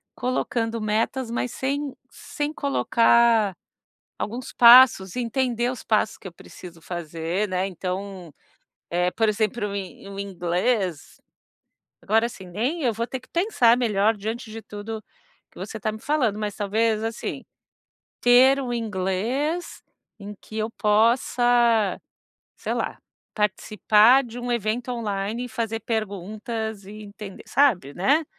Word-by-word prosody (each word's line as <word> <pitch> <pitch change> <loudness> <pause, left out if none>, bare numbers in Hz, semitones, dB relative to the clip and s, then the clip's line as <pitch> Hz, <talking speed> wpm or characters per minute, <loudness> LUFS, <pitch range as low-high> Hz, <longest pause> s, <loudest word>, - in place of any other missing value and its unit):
colocando 230 -2 -2
metas, 225 +4 -1
mas 245 0 -2
sem 280 +1 -2 0.2
sem 295 +1 -5
colocar 235 - +3 0.6
alguns 240 +4 -5
passos. 235 -6 +7
Entender 245 0 0
os 255 - -7
passos 220 0 +1
que - - -13
eu - - -13
preciso 170 -1 -13
fazer, 170 +3 -3
né, 185 +1 -1
então, 185 -2 -5 0.6
eh, 180 +1 +1
por 225 -1 +1
exemplo, 215 0 0
o 200 - -6
in 195 0 -7
o 195 0 -9
inglês, 180 -2 -2 0.8
agora, 225 +3 +2
assim, 195 -6 -11
nem, 245 - -2
eu 240 -3 +2
vou 230 +3 -3
ter 260 - -5
que - - -21
pensar 335 - +3
melhor. 220 -2 +2
Diante 220 +3 -5
de 225 - -7
tudo 215 +1 -7 0.5
que, - - -21
você 220 - -6
está 215 +1 -2
me 215 - -8
falando, 255 -9 0
mas 210 -1 -3
talvez, 215 +1 0
assim, 225 0 -4 0.8
ter 255 +3 +6
um 245 -2 -3
inglês 230 - -2 0.4
em 205 0 -8
que 220 - -11
eu 220 +1 -1
possa, 230 0 +2 0.6
sei - - -4
lá, - - -3 0.4
participar, 215 +4 +4
de 240 +1 -9
um 245 0 -4
evento 235 +2 -1
online, 220 0 -3
e - - -7
fazer 225 0 -3
perguntas 215 0 -4
e 215 +2 -10
entender, 205 -1 -10
sabe, 215 - +2
né? 285 - +2
220 Hz, 135 wpm, -24 LUFS, 200-245 Hz, 0.8 s, passos